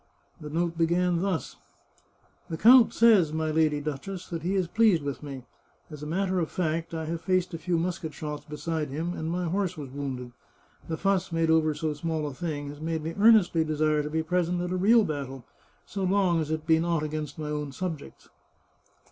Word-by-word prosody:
The 150 - -7
note 170 +2 -1
began 175 +1 +2
thus: 185 -8 -2 0.4
" - - -37
The 160 - -3
count 240 +5 +7
says, 215 -9 +5
my 160 0 -1
Lady 155 -1 +2
Duchess, 155 +6 -5
that 165 -2 -4
he 180 +5 -1
is 185 -3 +1
pleased 205 -5 +3
with 140 -1 -4
me. 140 -3 -7 0.5
As 150 -1 -9
a 150 - -5
matter 185 +3 0
of 165 - -1
fact, 165 -1 -2
I 160 -1 -3
have 165 +1 -4
faced 185 -1 0
a 165 - -4
few 170 +2 0
musket 165 -2 -2
shots 150 0 -6
beside 150 0 -3
him, 160 +6 -3
and 160 -2 -4
my 175 +1 -1
horse 185 0 -1
was 140 -4 -7
wounded. 130 -3 -5 0.6
The 160 - -3
fuss 195 -1 0
made 165 -1 +1
over 155 -1 +3
so 155 0 -2
small 160 0 -2
a 145 - -4
thing 145 -2 -4
has 145 +1 -10
made 160 -1 -2
me 165 +1 -3
earnestly 205 -7 +5
desire 155 -1 +1
to 150 - -4
be 160 +1 -1
present 175 +1 0
at 180 0 -3
a - - 0
real 215 +5 +5
battle, 135 - -5 0.4
so 195 - -4
long 185 -3 +2
as 155 - -4
it 155 0 -2
be 160 0 +4
not 170 -2 0
against 155 0 -4
my 155 -1 -4
own 150 -1 -3
subjects. 165 0 -6
160 Hz, 205 wpm, -27 LUFS, 150-180 Hz, 0.6 s, count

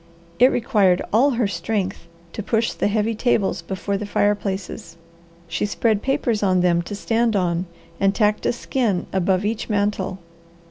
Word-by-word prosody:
It 250 - +8
required 210 -7 +2
all 250 +6 +5
her 235 -4 +2
strength 195 0 -3 0.3
to - - -4
push 225 +2 0
the - - 0
heavy 215 +2 0
tables 220 -3 0
before 200 +1 -3
the 205 +1 -5
fireplaces. 195 -5 -2 0.5
She 170 +5 -1
spread 215 0 +1
papers 265 -5 0
on 185 -3 +3
them 175 -1 +3
to 205 - -4
stand 225 +1 0
on, 180 -1 0 0.3
and 195 0 +2
tacked 210 -1 +1
a - - +3
skin 240 -5 -1
above 190 +1 +1
each 220 +2 -2
mantel. 200 -2 -1
205 Hz, 155 wpm, -22 LUFS, 190-225 Hz, 0.5 s, It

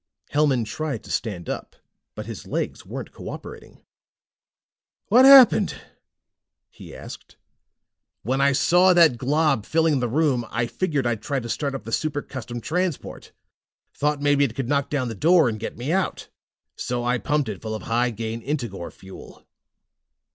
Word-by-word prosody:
Hellman 145 -5 +2
tried 135 +2 -4
to - - -10
stand 95 -8 -3
up, - - -6 0.4
but 105 - -6
his 110 -3 -8
legs - - -4
weren't - - -7
cooperating. - - -10 1.3
"What 250 +5 +7
happened?" 265 -7 +7 1.0
he - - -12
asked. - - -11 0.9
"When 130 +5 0
I 140 0 +4
saw 180 +6 +4
that 160 -9 +5
glob 145 -3 +1
filling 160 +1 +1
the 120 -1 -1
room, 135 -2 +1
I 115 +1 -1
figured 145 0 -2
I'd 120 -3 -1
try 140 +4 -2
to 120 - -7
start 140 +4 -2
up 135 - -6
the 115 - -8
Super 145 +3 -1
Custom 120 -2 -7
Transport. 175 +5 -3 0.6
Thought 150 0 -1
maybe 145 -1 +3
it 120 -5 -1
could 135 -3 -3
knock 140 0 0
down 135 -4 -1
the 115 - -4
door 165 - +4
and 110 -2 -3
get - - -6
me 125 +6 -3
out. 190 +1 -1 0.5
So 120 -1 -3
I 120 0 0
pumped 145 +1 0
it 105 -3 -6
full 110 -1 -4
of 110 - -7
high 120 +2 +1
gain 115 0 -5
Integor 120 - -4
fuel." 95 0 -14
135 Hz, 160 wpm, -23 LUFS, 115-150 Hz, 1.3 s, What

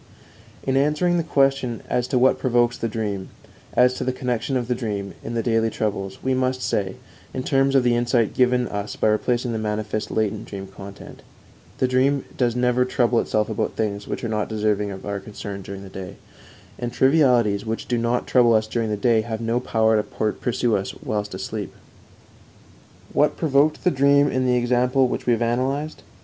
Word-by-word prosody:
In 135 - 0
answering 150 +5 +2
the 170 - +1
question 135 -6 +1
as 125 0 0
to 130 - 0
what 130 +1 +4
provokes 120 -1 +2
the 115 - -2
dream, 105 -4 -3 0.5
as 125 +1 +5
to - - -4
the 130 - 0
connection 125 0 -1
of 120 -2 -3
the 125 - +1
dream, 105 -5 -4
in 120 - -5
the 115 - 0
daily 115 -1 +2
troubles, 100 -3 -3
we 130 - +1
must 130 0 0
say, 95 -2 -1 0.4
in 130 - -2
terms 135 0 +2
of 135 - +5
the 120 -1 +3
insight 120 -2 +1
given 125 -1 +2
us 100 0 -4
by - - +2
replacing 120 +3 0
the 110 - -2
manifest 105 0 -2
latent 110 -1 -1
dream 100 -1 -6
content: 95 0 -11 0.6
_The 130 - +3
dream 130 +2 +2
does 120 -2 +1
never 125 0 +2
trouble 120 -2 +2
itself 105 -1 0
about 110 - -2
things 100 -2 -2
which - - -4
are - - -1
not 105 -1 -2
deserving 105 -2 0
of 95 -1 -8
our 100 -1 -3
concern 100 0 -7
during 95 +1 -8
the - - -9
day, 95 -1 -8 0.6
and 120 0 -3
trivialities 125 -7 +3
which 115 0 -4
do 120 -2 0
not 120 +1 0
trouble 120 -3 +4
us 110 0 +2
during 110 0 -2
the 105 - -1
day 115 +1 +3
have 110 0 -4
no 115 +1 0
power 110 -3 +2
to 105 0 -2
pursue 120 -2 0
us 95 - -5
whilst 105 -1 -3
asleep_. 100 +1 -4 1.4
What 150 - +2
provoked 150 -1 +2
the 180 - +3
dream 140 +1 +4
in 130 0 0
the 125 - +3
example 125 +2 +2
which 125 - -4
we 120 - +5
have 115 0 0
analyzed? 135 +6 -1
120 Hz, 195 wpm, -23 LUFS, 105-130 Hz, 1.4 s, as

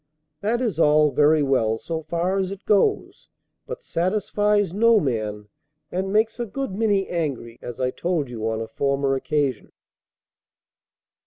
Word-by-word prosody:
That 230 +6 0
is 220 -10 -1
all 150 -1 +4
very 150 +1 +4
well 115 -5 +1
so 160 +7 -4
far 170 +5 -1
as 190 -1 -1
it 195 0 -9
goes, 210 - +1 0.4
but 485 +1 -7
satisfies 205 - 0
no 230 +2 +5
man, 110 - -3 0.4
and 190 +2 -2
makes 220 +3 +1
a 240 - -2
good 270 +3 -4
many 200 -1 +1
angry, 140 -9 -4
as 120 +1 -8
I 130 -1 0
told 170 -3 -1
you 115 -2 -3
on 110 0 -2
a 115 - -4
former 140 +3 0
occasion. 135 0 -1
165 Hz, 150 wpm, -23 LUFS, 135-205 Hz, 0.4 s, no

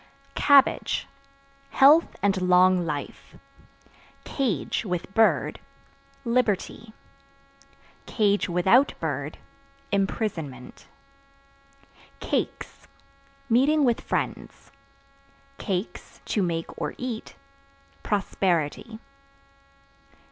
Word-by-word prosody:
C 275 0 -31
Cabbage 280 -2 +4 0.6
Health 290 +5 +5
and 195 -2 +1
long 180 -1 +4
life. 145 -2 -6 0.9
Cage 235 - -2
(With 180 -1 -4
bird) 225 +1 +2 0.7
liberty; 230 -2 -1 1.6
(without 190 +11 +3
bird) 145 -2 -4 0.5
imprisonment. 185 - -3 1.3
Cakes - - -4 0.6
Meeting 275 +6 +3
with 240 -2 +1
friends; - - -4 0.9
(to 200 +1 -4
make 165 -2 -3
or 150 - -3
eat) 245 - -6 0.7
prosperity. 190 - -1
200 Hz, 65 wpm, -25 LUFS, 175-240 Hz, 1.6 s, Health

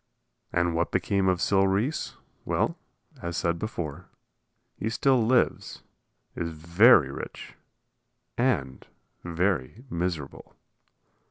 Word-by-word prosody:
And 85 -1 +1
what 85 +1 0
became 95 +1 +1
of 90 -2 +2
Sil 95 -1 +3
Reese? 110 +11 -1 0.3
Well, - - 0 0.5
as 85 -1 -4
said 85 0 0
before, 85 -5 -5 0.7
he 110 - -3
still 130 +1 +2
lives, 120 +2 +1 0.5
is 85 - -3
very 85 - +5
rich - - -8 0.8
and 90 - -1 0.4
very 90 - -1
miserable. 85 -5 -4
90 Hz, 100 wpm, -27 LUFS, 85-110 Hz, 0.8 s, very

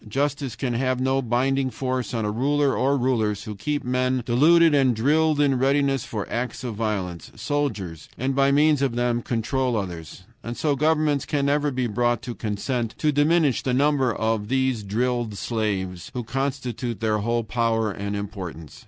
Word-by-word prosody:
Justice 140 +1 -1
can 125 -3 -2
have 130 +1 0
no 130 +1 +1
binding 130 +2 +1
force 130 -1 -3
on 115 -3 -1
a 105 - 0
ruler 140 +4 +1
or 140 +2 +2
rulers 110 -5 0
who 105 - -6
keep 145 +9 -3
men, 125 0 0
deluded 160 +7 +5
and 135 -4 +3
drilled 150 +6 +2
in 140 -3 +3
readiness 135 -1 +2
for 105 -3 -4
acts 125 +2 -3
of 120 -3 -3
violence 100 -6 -3
soldiers, 110 - -3
and 130 +2 -1
by 135 0 +4
means 150 0 +4
of 135 -4 0
them 120 0 0
control 125 +1 -1
others. 90 -3 -6 0.2
And 120 +1 -5
so 150 -2 +1
governments 150 -1 +1
can 140 -2 0
never 145 +1 +2
be 130 -2 -1
brought 120 +1 0
to 120 - -5
consent 115 +2 -3
to 155 - +2
diminish 145 -1 +3
the 125 -2 0
number 140 -2 +2
of 110 -2 -1
these 130 -2 +1
drilled 115 +1 -1
slaves, 95 -6 -2
who 125 - -2
constitute 125 -3 -3
their 110 -1 +1
whole 115 +2 0
power 115 -1 0
and 100 +1 -4
importance. 90 -6 -7
125 Hz, 175 wpm, -24 LUFS, 110-140 Hz, 0.2 s, deluded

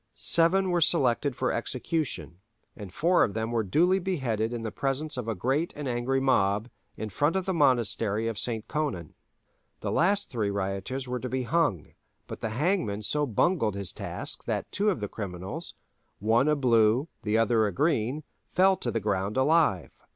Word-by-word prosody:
Seven 185 +3 +3
were 175 -1 +1
selected 140 -4 +2
for - - 0
execution, 125 - -3 0.4
and 100 -4 -9
four 175 - +3
of 100 - -1
them 110 +1 -2
were 115 -1 +1
duly 170 - +2
beheaded 130 - -1
in 120 -2 -4
the 110 - -3
presence 140 +6 -2
of 125 -3 -4
a 115 - -1
great 135 - -1
and 150 -2 -5
angry 125 +2 0
mob, 105 -4 +2 0.3
in 110 - -4
front 145 - +1
of 190 -1 0
the 190 - 0
monastery 115 - +2
of 115 -3 -2
St. 110 -3 -2
Conon. 140 - -3 0.7
The - - -2
last 200 +2 +1
three 110 -6 -1
rioters 100 +6 -3
were 125 0 -2
to 125 - -5
be 130 0 -1
hung, 135 - 0 0.3
but - - -8
the 115 - -2
hangman 115 - 0
so 150 +6 0
bungled 115 - +1
his 100 -2 -5
task - - -4
that - - -3
two 210 +1 +1
of 185 - -1
the 105 - -2
criminals, 100 - -6 0.4
one 115 +7 +2
a 150 - +3
Blue 120 0 +3
the 105 0 0
other 115 -1 +3
a - - -2
Green, 145 - 0 0.3
fell 190 +1 +4
to 120 - -3
the 115 - -1
ground 100 +1 -1
alive. 135 - +2
120 Hz, 180 wpm, -27 LUFS, 105-155 Hz, 0.7 s, fell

